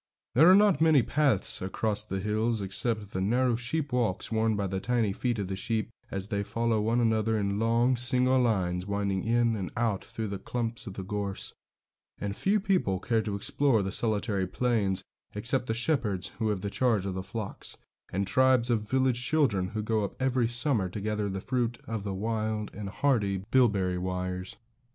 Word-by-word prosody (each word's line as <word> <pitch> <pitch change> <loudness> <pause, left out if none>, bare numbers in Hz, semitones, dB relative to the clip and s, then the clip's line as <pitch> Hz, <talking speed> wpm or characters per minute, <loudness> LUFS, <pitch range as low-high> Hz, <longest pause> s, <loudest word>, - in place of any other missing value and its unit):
There 160 +8 +7
are 185 - +8
not 200 -6 +4
many 155 -6 +5
paths 140 -9 +2
across 105 +3 -1
the 95 -2 -4
hills, 110 +3 0
except 105 +2 0
the 95 - -2
narrow 120 +4 +2
sheep 135 +4 -2
walks 115 -6 0
worn 110 0 +1
by 100 -1 -1
the 95 0 -2
tiny 115 -2 0
feet 120 +2 -1
of 100 -3 -2
the 95 - -3
sheep 110 +3 -2 0.2
as 95 +1 -4
they 100 -3 -1
follow 115 +1 0
one 115 +3 +1
another 110 -1 +2
in 100 -1 -1
long, 115 +3 +3
single 125 +1 +3
lines, 95 -6 0
winding 100 -2 -1
in 115 0 +2
and 95 -4 -4
out 115 -5 0
through 110 -2 -5
the 100 -1 -4
clumps 115 +2 -4
of 100 - -6
gorse; 100 -2 -4 0.6
and 100 -1 -4
few 205 - +2
people 185 - +1
care 115 +1 +1
to 105 -2 -3
explore 115 +2 +1
the 95 - -3
solitary 105 -3 0
plains, 105 -4 0 0.3
except 125 +4 0
the 110 - 0
shepherds 115 - 0
who 110 -2 +1
have 100 -3 -1
the 100 0 -3
charge 115 -6 +1
of 95 - -2
the 95 - -3
flocks, 105 +2 -6 0.3
and 100 +2 -1
tribes 130 +3 +3
of 110 -2 -1
village 130 -2 +2
children 130 -11 +2
who 105 +2 -4
go 110 -1 0
up 100 - -5
every 130 -2 +1
summer 120 -5 +1
to 100 - -6
gather 105 0 -2
the 95 0 -3
fruit 120 -2 -1
of 110 -2 -3
the 100 -2 -3
wild 110 +1 -2
and 100 -1 -6
hardy 100 -6 0
bilberry 100 -8 +3
wires. 90 0 -4
110 Hz, 190 wpm, -28 LUFS, 100-120 Hz, 0.6 s, are